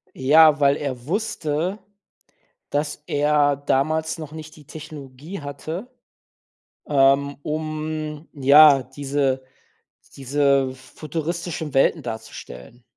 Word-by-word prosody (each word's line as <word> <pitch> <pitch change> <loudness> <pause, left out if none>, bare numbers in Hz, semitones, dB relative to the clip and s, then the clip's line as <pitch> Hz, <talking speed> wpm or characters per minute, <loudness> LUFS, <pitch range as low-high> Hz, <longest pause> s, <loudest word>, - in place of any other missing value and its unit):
Ja, 150 +3 +5
weil 140 -1 +4
er 130 -5 -5
wusste, 185 -2 -2 0.9
dass 150 0 -3
er 145 0 +2
damals 155 +4 0
noch 155 -2 -8
nicht 155 -1 -10
die 150 - -16
Technologie 150 +2 -9
hatte, 155 - -6 1.0
ähm, 140 0 +3
um, 155 0 -4
ja, 140 0 +7
diese 135 0 -2 0.7
diese 140 -1 +1
futuristischen 160 +3 -5
Welten 135 - +3
darzustellen. 115 - -9
145 Hz, 95 wpm, -22 LUFS, 135-155 Hz, 1.0 s, ja